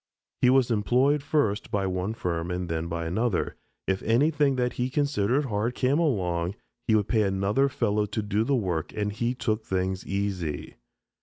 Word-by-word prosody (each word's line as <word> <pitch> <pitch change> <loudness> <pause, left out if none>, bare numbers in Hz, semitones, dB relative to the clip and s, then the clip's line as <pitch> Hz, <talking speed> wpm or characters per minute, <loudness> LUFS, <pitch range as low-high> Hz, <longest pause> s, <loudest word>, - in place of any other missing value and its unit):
He 125 - +5
was 130 -2 +4
employed 125 +7 +3
first 140 -8 0
by 100 -1 0
one 95 +3 -2
firm 85 -4 -2
and 90 0 -2
then 80 0 -2
by 85 0 -3
another; 105 +4 0 0.3
if 95 0 0
anything 140 +4 +3
that 125 -1 0
he 125 +1 -1
considered 140 -2 +1
hard 115 +1 -1
came 135 +4 +2
along, 90 - 0 0.3
he 110 - +4
would 105 -1 +2
pay 110 -3 +2
another 100 +7 +2
fellow 105 -5 0
to 110 +1 -3
do 105 +1 +1
the 140 +4 +1
work 90 -8 -1
and 105 -1 -1
he 120 +4 -1
"took 110 -3 -1
things 95 -1 -1
easy." 95 -6 -2
105 Hz, 175 wpm, -27 LUFS, 95-125 Hz, 0.3 s, He